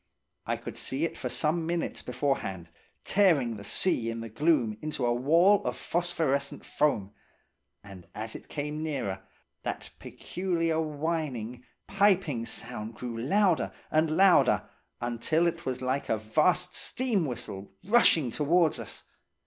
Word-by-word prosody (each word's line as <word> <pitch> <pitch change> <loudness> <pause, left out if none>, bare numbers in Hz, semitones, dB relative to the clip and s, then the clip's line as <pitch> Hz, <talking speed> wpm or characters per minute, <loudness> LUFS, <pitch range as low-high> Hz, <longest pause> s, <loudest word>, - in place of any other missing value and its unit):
I - - 0
could - - -8
see 140 +5 -1
it - - -4
for - - -4
some 160 +1 0
minutes 170 0 -2
beforehand, 95 - -2 0.3
tearing 160 - +3
the 100 - -9
sea 120 - +1
in 115 0 -4
the 115 - -6
gloom 120 -5 +1
into 150 -4 -2
a 120 - +2
wall 165 +11 +4
of - - -2
phosphorescent 160 -5 -1
foam; 105 -10 0 0.7
and 95 -3 -12
as 110 +1 -4
it - - -10
came 150 +1 -4
nearer, 130 -12 -3 0.4
that - - -5
peculiar 165 -3 -2
whining, 145 -6 -3 0.2
piping 190 - +2
sound 115 -2 -5
grew 120 0 -5
louder 175 - +2 0.2
and 155 0 +2
louder, 190 -1 +5 0.3
until 120 +8 0
it 170 -2 -2
was 130 0 -3
like 130 +2 -1
a 110 - +2
vast 165 - +2
steam 225 - 0
whistle 110 -6 -6
rushing 175 - +4
towards 160 +4 +2
us. - - -7
150 Hz, 140 wpm, -29 LUFS, 120-170 Hz, 0.7 s, louder